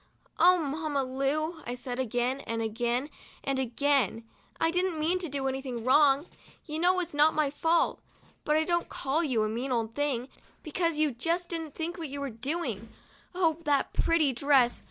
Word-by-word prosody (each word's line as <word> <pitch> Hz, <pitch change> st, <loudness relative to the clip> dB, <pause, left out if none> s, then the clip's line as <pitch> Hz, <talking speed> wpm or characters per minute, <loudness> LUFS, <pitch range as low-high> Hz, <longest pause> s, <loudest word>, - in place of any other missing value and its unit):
"Oh, 360 Hz, +1 st, +7 dB
Mamma 300 Hz, -2 st, -1 dB
Lu!' 285 Hz, +5 st, -1 dB
I 245 Hz, -, -3 dB
said 250 Hz, 0 st, -5 dB
again 250 Hz, +2 st, 0 dB
and 230 Hz, 0 st, -1 dB
again 240 Hz, +5 st, -1 dB, 0.3 s
and 270 Hz, -1 st, -1 dB
again, 260 Hz, -3 st, +1 dB, 0.2 s
" -, -, -31 dB
I 325 Hz, -, +2 dB
didn't 360 Hz, -1 st, 0 dB
mean 330 Hz, +4 st, +1 dB
to 345 Hz, -3 st, -3 dB
do 275 Hz, -1 st, -2 dB
any 265 Hz, 0 st, -2 dB
wrong. 275 Hz, +5 st, +4 dB, 0.4 s
You 310 Hz, -1 st, -4 dB
know 365 Hz, +2 st, +3 dB
it's 345 Hz, -2 st, -5 dB
not 300 Hz, +2 st, +4 dB
my 300 Hz, -2 st, +1 dB
fault. 325 Hz, +3 st, +1 dB, 0.4 s
But 300 Hz, -, +1 dB
I 315 Hz, -, +3 dB
don't 345 Hz, +1 st, 0 dB
call 285 Hz, +5 st, -1 dB
you 250 Hz, -8 st, +1 dB
a -, -, +1 dB
mean 240 Hz, +5 st, -3 dB
old 230 Hz, -2 st, -1 dB
thing, 265 Hz, -3 st, -1 dB, 0.4 s
because 330 Hz, 0 st, -1 dB
you 305 Hz, -1 st, +2 dB
just 335 Hz, +8 st, -2 dB
didn't 325 Hz, -4 st, -4 dB
think 340 Hz, +2 st, -4 dB
what 320 Hz, -3 st, -4 dB
you 280 Hz, +1 st, -5 dB
were 280 Hz, -2 st, -3 dB
doing. 230 Hz, -, -3 dB, 0.5 s
Oh, 330 Hz, -3 st, +2 dB
that 285 Hz, -2 st, +1 dB
pretty 320 Hz, -5 st, +2 dB
dress! 260 Hz, -1 st, +3 dB
285 Hz, 185 wpm, -29 LUFS, 255-325 Hz, 0.5 s, Oh